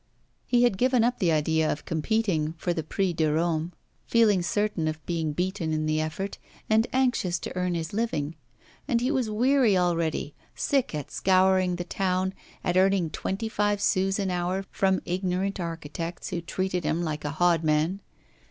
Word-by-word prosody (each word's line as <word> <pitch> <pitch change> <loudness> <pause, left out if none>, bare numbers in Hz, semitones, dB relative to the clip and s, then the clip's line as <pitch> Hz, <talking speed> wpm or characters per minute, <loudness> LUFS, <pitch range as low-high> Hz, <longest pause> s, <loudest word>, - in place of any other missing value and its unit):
He 245 -1 +4
had 240 -6 +2
given 255 -2 +3
up 245 +1 +1
the 175 -3 +2
idea 160 0 +2
of 150 - -5
competing 160 -2 0
for 175 +1 -2
the 165 - -2
Prix 180 +4 -1
de 160 -2 +1
Rome, 165 +1 0 0.4
feeling 215 -5 +4
certain 205 -2 0
of 155 0 -4
being 165 -3 -1
beaten 175 0 -2
in 155 0 0
the 155 0 +1
effort, 175 +6 -4 0.3
and 220 +1 +3
anxious 245 -9 +1
to - - -7
earn 180 -1 0
his 165 +1 -4
living. 165 -9 -1 0.5
And 240 -5 +2
he 250 +3 0
was 260 -6 0
weary 240 -1 +3
already; 170 -4 0 0.2
sick 270 - 0
at 150 -3 -5
scouring 185 -1 +3
the 175 - -3
town, 185 +1 -1 0.3
at 180 0 +1
earning 190 -3 +3
twenty 200 +4 -3
five 205 -1 0
sous 195 -1 +1
an 195 -3 -1
hour 180 +2 -1
from 190 -1 +1
ignorant 185 +2 -1
architects, 165 0 -5
who 175 -2 -3
treated 180 +1 -2
him 165 +3 0
like 155 -2 -3
a 145 - -2
hodman. 165 +1 +2
180 Hz, 170 wpm, -27 LUFS, 160-200 Hz, 0.5 s, He